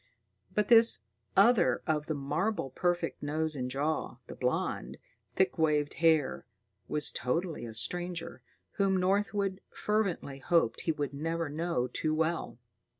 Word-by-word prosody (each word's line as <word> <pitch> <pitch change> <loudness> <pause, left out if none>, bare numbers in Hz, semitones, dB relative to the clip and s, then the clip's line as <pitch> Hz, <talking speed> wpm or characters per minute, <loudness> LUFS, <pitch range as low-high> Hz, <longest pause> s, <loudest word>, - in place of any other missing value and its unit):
But 210 -1 +2
this 230 - +6 0.3
other 205 -1 +5
of 155 -2 0
the 155 - -1
marble 155 +3 -1
perfect 175 +3 -1
nose 155 +1 -1
and 125 -2 -3
jaw, 140 -1 -2
the - - -9
blond, 125 0 -2 0.4
thick 190 -2 +1
waved 150 -2 +2
hair, 160 -6 +2 0.4
was 150 - +1
totally 155 +1 -2
a 110 - -9
stranger, 175 +8 -2 0.4
whom 195 -1 +3
Northwood 195 +1 0
fervently 195 -10 -1
hoped 165 -6 +1
he 165 - 0
would 145 -3 -3
never 165 +2 -2
know 160 -3 -1
too 155 +4 -1
well. 160 -4 -1
160 Hz, 135 wpm, -30 LUFS, 145-185 Hz, 0.4 s, this